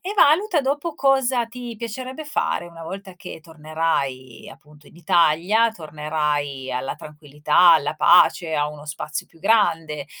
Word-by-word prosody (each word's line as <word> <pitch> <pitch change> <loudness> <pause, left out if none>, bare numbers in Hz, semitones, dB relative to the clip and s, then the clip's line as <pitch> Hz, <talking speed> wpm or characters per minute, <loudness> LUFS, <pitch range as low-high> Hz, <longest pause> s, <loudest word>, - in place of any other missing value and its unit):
e 390 - -3
valuta 350 -1 +3
dopo 290 +4 -2
cosa 265 -4 +1
ti 240 0 -8
piacerebbe 255 +6 -6
fare, 290 - -2
una 170 -1 -12
volta 190 +3 -8
che 175 - -10
tornerai 155 -6 -4
appunto 150 0 -20
in - - -19
Italia, 175 +7 +2
tornerai 150 -4 -3
alla 130 +1 -3
tranquillità, 150 +3 +2
alla 155 -1 +1
pace, 165 0 +4
a 150 -1 0
uno 150 0 -11
spazio 150 0 -6
più - - -24
grande, 165 -8 +1
165 Hz, 140 wpm, -22 LUFS, 150-230 Hz, -, pace